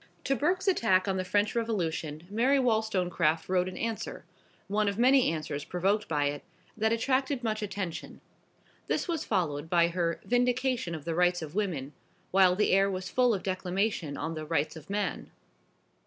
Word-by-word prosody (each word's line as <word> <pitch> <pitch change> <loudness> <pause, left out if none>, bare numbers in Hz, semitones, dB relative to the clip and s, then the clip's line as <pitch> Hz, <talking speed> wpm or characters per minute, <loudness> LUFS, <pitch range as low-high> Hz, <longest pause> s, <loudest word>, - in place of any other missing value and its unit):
To 275 - +1
Burke's 365 +7 0
attack 215 - +3
on 190 -1 0
the 185 - -1
French 205 +3 +1
Revolution 170 -9 -2
Mary 240 +8 +2
Wollstonecraft 185 - +1
wrote 185 0 +1
an 185 - -9
Answer 230 -1 -4 0.4
one 210 +1 +1
of 200 0 -1
many 255 -2 +5
answers 155 -3 -4
provoked 195 +6 0
by 145 -2 +1
it 145 0 -2 0.3
that 220 0 +1
attracted 260 +3 0
much 215 -1 -1
attention. 195 -5 -5 0.7
This - - -1
was 330 -3 -1
followed 160 -6 -1
by 170 -1 +4
her 170 -1 -1
"Vindication 245 -5 +1
of 155 -2 -9
the 165 - -1
Rights 175 0 +2
of 155 -1 -8
Woman," 170 -9 -2 0.4
while 185 -1 +5
the 210 - +2
air 195 +1 +4
was 185 -1 -4
full 250 -1 +3
of 200 -4 -1
declamation 185 -4 -1
on 160 +2 -3
the 155 -1 -5
"Rights 155 0 -1
of 160 +1 -12
Man." 205 0 -2
190 Hz, 170 wpm, -29 LUFS, 165-225 Hz, 0.7 s, many